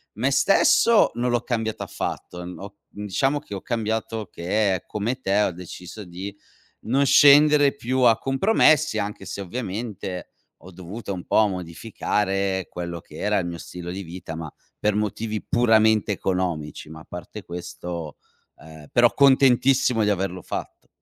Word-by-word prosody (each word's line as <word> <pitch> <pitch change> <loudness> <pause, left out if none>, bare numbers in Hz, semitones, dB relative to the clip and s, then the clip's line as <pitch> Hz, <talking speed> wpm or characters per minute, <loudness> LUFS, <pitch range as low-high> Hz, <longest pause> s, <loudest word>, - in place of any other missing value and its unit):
me 125 +6 0
stesso 205 +8 +4
non 125 +1 0
l'ho 120 -1 +1
cambiato 110 -3 -2
affatto. 90 0 -5
Mhmm, 90 - -8
ho 100 +1 -9
mhmm, 105 +1 -8
diciamo 135 +9 0
che 125 -9 -8
ho 95 - -6
cambiato 110 -2 -3
che 95 +1 0
come 115 +5 -3
te 100 -2 +2
ho 105 - +1
deciso 90 +3 -9
di 95 +3 -8 0.4
non 135 +5 +1
scendere 145 +1 +6
più 130 -1 -2
a 115 -3 +5
compromessi, 155 - +3
anche 100 -1 -4
se 95 - -6
ovviamente 100 -3 -5 0.4
ho 95 - -11
dovuto 95 +4 -7
un 90 -2 -7
po' 110 - +3
modificare 95 +1 -2
quello 85 -1 -6
che - - -16
era 105 0 0
il 90 - -1
mio 85 -1 -5
stilo 90 +1 -8
di 95 +2 -5
vita, 85 -2 -8
ma 80 -1 -6 0.3
per 105 -1 +1
motivi 105 +1 -2
puramente 110 -3 +3
economici, 90 -6 -3
ma 80 0 -10
a - - -15
parte 90 +4 -9
questo 85 -2 -7 0.4
ehm, 80 -1 -13
però 120 -1 +4
contentissimo 130 -3 +4
di 105 - +2
averlo 95 -2 -2
fatto. - - -7
105 Hz, 155 wpm, -24 LUFS, 90-120 Hz, 0.4 s, scendere